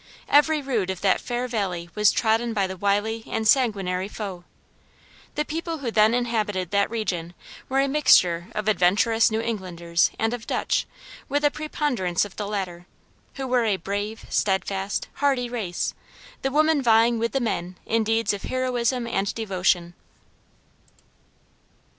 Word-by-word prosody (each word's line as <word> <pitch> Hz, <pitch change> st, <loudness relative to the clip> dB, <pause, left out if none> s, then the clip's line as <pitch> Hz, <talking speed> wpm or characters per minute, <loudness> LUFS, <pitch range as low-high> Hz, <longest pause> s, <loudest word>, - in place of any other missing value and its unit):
Every 295 Hz, +1 st, +4 dB
rood 230 Hz, -9 st, -1 dB
of 190 Hz, -1 st, -4 dB
that 195 Hz, -2 st, +2 dB
fair 245 Hz, 0 st, -3 dB
valley 190 Hz, -7 st, -2 dB
was 210 Hz, -1 st, +4 dB
trodden 225 Hz, +1 st, +1 dB
by 200 Hz, -3 st, +1 dB
the 190 Hz, 0 st, -5 dB
wily 205 Hz, +4 st, 0 dB
and 220 Hz, -1 st, -1 dB
sanguinary 195 Hz, -7 st, +2 dB
foe. 195 Hz, -4 st, -7 dB, 0.9 s
The 300 Hz, -, 0 dB
people 330 Hz, +2 st, -4 dB
who 260 Hz, -6 st, -3 dB
then 220 Hz, +1 st, +4 dB
inhabited 210 Hz, -7 st, -1 dB
that 200 Hz, 0 st, +2 dB
region 180 Hz, -7 st, -3 dB, 0.3 s
were 265 Hz, +1 st, +1 dB
a 275 Hz, -, +1 dB
mixture 185 Hz, -, +4 dB
of 215 Hz, 0 st, -3 dB
adventurous 215 Hz, +3 st, +3 dB
New 220 Hz, 0 st, -1 dB
Englanders 175 Hz, -7 st, 0 dB
and 225 Hz, +1 st, 0 dB
of 245 Hz, -2 st, -6 dB
Dutch, -, -, 0 dB, 0.4 s
with 290 Hz, +2 st, +1 dB
a 290 Hz, -, +4 dB
preponderance 275 Hz, -, -1 dB
of 200 Hz, -, -11 dB
the 205 Hz, -, -4 dB
latter, 180 Hz, -4 st, -4 dB, 0.5 s
who 270 Hz, -, -4 dB
were 250 Hz, -2 st, +2 dB
a 205 Hz, -3 st, +1 dB
brave, 205 Hz, +4 st, -4 dB
steadfast, 195 Hz, 0 st, -1 dB
hardy 265 Hz, -4 st, +2 dB
race; 195 Hz, -8 st, -2 dB, 0.5 s
the 270 Hz, -, 0 dB
women 305 Hz, +1 st, +3 dB
vieing 230 Hz, 0 st, +4 dB
with 230 Hz, +1 st, -1 dB
the 270 Hz, -, +1 dB
men 180 Hz, -7 st, -3 dB
in 225 Hz, 0 st, +1 dB
deeds 225 Hz, 0 st, +1 dB
of 200 Hz, -, -5 dB
heroism 250 Hz, -1 st, -1 dB
and 200 Hz, -4 st, -1 dB
devotion. 185 Hz, -5 st, 0 dB
220 Hz, 155 wpm, -24 LUFS, 190-245 Hz, 0.9 s, Every